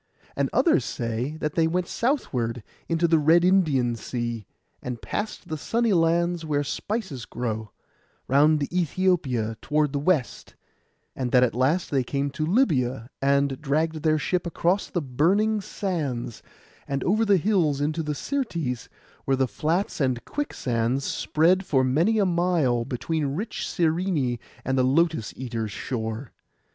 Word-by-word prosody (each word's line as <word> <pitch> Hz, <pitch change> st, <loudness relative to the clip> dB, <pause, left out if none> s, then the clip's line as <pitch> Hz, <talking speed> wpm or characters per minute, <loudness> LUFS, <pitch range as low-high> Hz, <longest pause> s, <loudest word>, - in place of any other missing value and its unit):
And -, -, 0 dB
others 330 Hz, -3 st, +3 dB
say 120 Hz, +6 st, -3 dB
that 150 Hz, -1 st, -1 dB
they 165 Hz, -1 st, +3 dB
went 175 Hz, +2 st, -1 dB
southward, 125 Hz, -, -1 dB, 0.3 s
into 165 Hz, 0 st, +2 dB
the 165 Hz, -1 st, +4 dB
Red 165 Hz, +4 st, +5 dB
Indian 150 Hz, -11 st, +3 dB
Sea, 120 Hz, -3 st, -4 dB, 0.3 s
and 125 Hz, -2 st, -5 dB
past 210 Hz, -, -4 dB
the 155 Hz, -1 st, -4 dB
sunny 230 Hz, +5 st, +1 dB
lands 170 Hz, 0 st, +2 dB
where 145 Hz, -2 st, 0 dB
spices 160 Hz, -, -4 dB
grow, 110 Hz, -3 st, -4 dB, 0.6 s
round 150 Hz, +3 st, +4 dB
Æthiopia 145 Hz, -, 0 dB
toward 150 Hz, -1 st, +1 dB
the 140 Hz, -, 0 dB
West; 150 Hz, -4 st, -1 dB, 0.6 s
and 125 Hz, -2 st, -2 dB
that 125 Hz, -1 st, +5 dB
at 125 Hz, -, +2 dB
last 140 Hz, +9 st, +1 dB
they 135 Hz, -3 st, +2 dB
came 140 Hz, +3 st, -2 dB
to 155 Hz, +3 st, -2 dB
Libya, 130 Hz, -, +1 dB
and 140 Hz, 0 st, +2 dB
dragged 155 Hz, +2 st, 0 dB
their 155 Hz, 0 st, +3 dB
ship 175 Hz, +4 st, -1 dB
across 175 Hz, +3 st, 0 dB
the 175 Hz, -5 st, -2 dB
burning 195 Hz, -, +2 dB
sands, 150 Hz, -, -3 dB, 0.5 s
and 140 Hz, -1 st, -2 dB
over 215 Hz, +5 st, +2 dB
the 200 Hz, -3 st, +4 dB
hills 170 Hz, -7 st, +2 dB
into 155 Hz, +3 st, 0 dB
the 150 Hz, -1 st, -3 dB
Syrtes, 165 Hz, -, -3 dB, 0.4 s
where 135 Hz, -1 st, +2 dB
the 130 Hz, 0 st, +2 dB
flats 165 Hz, -, -1 dB
and 130 Hz, -3 st, 0 dB
quicksands 130 Hz, -, -1 dB
spread 175 Hz, +5 st, +2 dB
for 135 Hz, -7 st, +2 dB
many 165 Hz, +13 st, +2 dB
a 205 Hz, -, +3 dB
mile, 170 Hz, -9 st, +1 dB
between 150 Hz, +5 st, -2 dB
rich 210 Hz, +7 st, -4 dB
Cyrene 160 Hz, -7 st, 0 dB, 0.3 s
and 130 Hz, +1 st, +1 dB
the -, -, +4 dB
Lotus 155 Hz, -2 st, +2 dB
eaters' 115 Hz, -4 st, -4 dB
shore. 115 Hz, +2 st, -4 dB
150 Hz, 150 wpm, -25 LUFS, 125-175 Hz, 0.6 s, Red